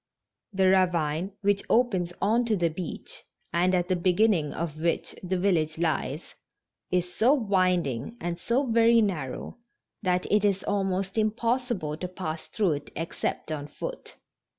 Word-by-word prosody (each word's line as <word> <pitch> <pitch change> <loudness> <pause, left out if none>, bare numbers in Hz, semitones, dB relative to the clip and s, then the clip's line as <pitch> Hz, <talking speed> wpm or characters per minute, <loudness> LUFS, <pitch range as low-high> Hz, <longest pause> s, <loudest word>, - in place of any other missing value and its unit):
The 190 -1 +2
ravine 180 -1 +2
which 200 0 +2
opens 195 -8 +2
onto 225 +2 +2
the 170 -4 +1
beach, 170 +2 -5 0.3
and 180 +2 +3
at 175 -1 +1
the 185 - +2
beginning 180 -3 +2
of 160 -2 -4
which 170 0 0
the 185 0 -1
village 165 -5 +1
lies, 160 -2 -2 0.6
is 180 0 0
so 240 +8 +4
winding 185 - 0
and 170 0 -3
so 240 +9 +1
very 230 -1 +5
narrow, 165 - -3 0.4
that 180 -1 +1
it 210 0 +4
is 195 -2 +2
almost 195 0 -1
impossible 225 - 0
to 180 - -4
pass 170 -3 -5
through 200 -6 +1
it 145 -1 -4
except 165 0 -3
on 145 -2 -4
foot. - - -7
185 Hz, 145 wpm, -27 LUFS, 165-205 Hz, 0.6 s, very